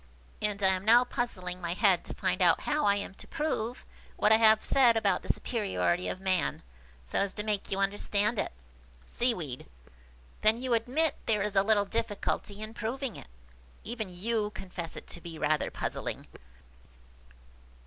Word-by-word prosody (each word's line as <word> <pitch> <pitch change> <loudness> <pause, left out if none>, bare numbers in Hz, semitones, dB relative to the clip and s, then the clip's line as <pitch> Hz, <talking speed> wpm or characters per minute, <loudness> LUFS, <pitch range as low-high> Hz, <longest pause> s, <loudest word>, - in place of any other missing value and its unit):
And 205 -1 -1
I 190 - +6
am 185 0 0
now 235 +4 +7
puzzling 185 -8 -3
my 170 -1 -2
head 190 -3 +3
to - - -6
find - - -1
out - - +5
how 300 0 0
I 200 - +5
am 200 -1 -4
to - - -12
prove 275 -7 -3 0.3
what 210 - +3
I 220 - +8
have 220 -1 +5
said 240 -4 +5
about 200 -4 +2
the - - -11
superiority 195 -5 -1
of - - -3
man, 190 -2 0 0.4
so - - -1
as 200 -1 0
to 210 - -4
make 210 -2 -2
you 195 - -1
understand 205 +2 +1
it." - - -1 0.5
Seaweed. 175 - -2 0.7
"Then 215 +1 +4
you 255 -1 -1
admit 265 +7 +1
there 210 -3 +2
is 210 -1 -3
a 195 - +6
little 205 0 +3
difficulty 210 -1 -2
in 215 +1 -7
proving 240 +2 -3
it? - - -11 0.6
Even 220 -3 -4
you 210 +4 -1
confess 180 -4 -6
it - - -8
to 170 - -6
be 165 -1 -8
rather 155 0 +1
puzzling." - - -4
210 Hz, 170 wpm, -30 LUFS, 190-230 Hz, 0.7 s, I